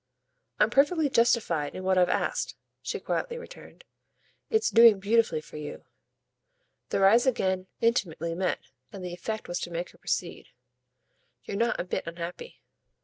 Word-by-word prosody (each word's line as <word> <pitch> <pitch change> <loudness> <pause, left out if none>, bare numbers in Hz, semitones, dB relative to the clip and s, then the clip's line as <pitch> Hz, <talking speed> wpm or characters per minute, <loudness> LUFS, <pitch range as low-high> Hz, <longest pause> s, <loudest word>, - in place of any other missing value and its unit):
"I'm - - +4
perfectly 295 +2 +3
justified 220 - +2
in 185 - -6
what 190 0 +2
I've 180 -1 +4
asked," - - -1 0.3
she - - -4
quietly 485 -1 -2
returned. 485 - -12 0.7
"It's 440 -1 +2
doing 230 -3 +7
beautifully 215 -4 +2
for 155 - -11
you." 150 -1 -7 1.0
Their 195 - +2
eyes 235 +6 +5
again 190 -6 0
intimately 185 -8 0
met, 180 +2 0 0.3
and 190 -2 -8
the 175 - -5
effect 215 +5 -5
was 175 - -3
to - - -5
make 170 +1 -4
her - - -23
proceed. - - -3 1.0
"You're - - -5
not 235 +2 +1
a - - 0
bit 180 - -4
unhappy." 170 - -7
195 Hz, 150 wpm, -28 LUFS, 175-235 Hz, 1.0 s, doing